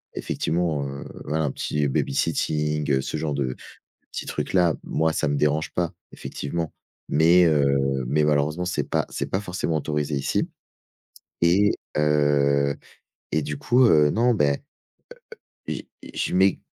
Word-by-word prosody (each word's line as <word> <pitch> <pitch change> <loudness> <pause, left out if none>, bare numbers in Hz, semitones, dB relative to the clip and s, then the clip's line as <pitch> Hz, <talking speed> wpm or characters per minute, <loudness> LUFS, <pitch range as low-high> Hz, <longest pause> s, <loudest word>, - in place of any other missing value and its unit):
effectivement, 80 -4 -1
heu, 70 0 -6 0.2
voilà, 80 +2 0
un 75 - 0
petit 75 +1 -1
baby-sitting, 75 +2 0
heu, 65 -1 +3
ce - - -4
genre 75 -2 -2
de 70 -2 -1
de 65 - -4 0.6
petits - - -6
trucs-là. 90 -4 +1
Moi, 80 +1 0
ça 80 - 0
me 70 - 0
dérange 75 +2 +1
pas, 85 -2 -1 0.2
effectivement. 80 +3 -5 0.4
Mais 85 +4 +5
heu 70 -3 +2
mais 75 +4 +2
malheureusement, 75 +4 +1
c'est 90 - -1
pas - - +1
c'est - - -4
pas 95 - 0
forcément 90 -5 -2
autorisé 75 0 -2
ici 70 - -1 0.9
et 95 +5 +4 0.3
heu 70 -2 +2 0.6
et 80 - +1
du 75 0 -4
coup, 125 - +4
heu, 75 -9 +5
non, 120 +5 +3
ben, 70 -9 +2 1.1
heu - - 0
heu, - - -5 0.2
j - - -10
je - - -1
mets 95 0 +4
75 Hz, 155 wpm, -24 LUFS, 70-85 Hz, 1.1 s, Mais